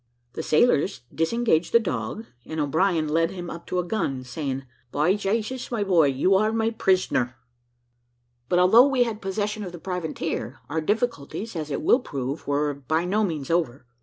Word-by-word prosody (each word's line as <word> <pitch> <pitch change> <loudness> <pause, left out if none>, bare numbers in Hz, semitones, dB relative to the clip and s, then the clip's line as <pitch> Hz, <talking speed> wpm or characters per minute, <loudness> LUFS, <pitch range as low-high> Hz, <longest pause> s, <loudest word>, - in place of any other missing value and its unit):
The - - -4
sailors 155 - +2
disengaged 170 0 +1
the 235 - +8
dog, 220 +1 -3 0.2
and 160 +5 -5
O'Brien 160 +2 +1
led 165 +2 +2
him 180 -2 -6
up 170 - -9
to 180 - -2
a 180 - +1
gun, 170 -9 -2
saying, 135 0 -4 0.3
"By 155 +6 +2
Jasus, 215 +5 -2
my 230 -4 -1
boy, 175 -6 +4
you 140 +8 +2
are 215 +3 +3
my 225 0 +1
prisoner." 185 - +1 1.1
But 175 - +3
although 220 +9 +7
we 265 -3 +3
had 225 -2 -4
possession 205 +2 -2
of 180 - -6
the 175 - -8
privateer, 165 - -4
our 160 +2 -1
difficulties, 220 - -2
as 155 -2 -4
it 140 - -3
will 245 - +5
prove, 140 - -5
were 145 +1 +1
by 155 +5 -1
no 210 +4 +1
means 160 -7 -2
over. 140 -7 0
175 Hz, 175 wpm, -25 LUFS, 150-210 Hz, 1.1 s, the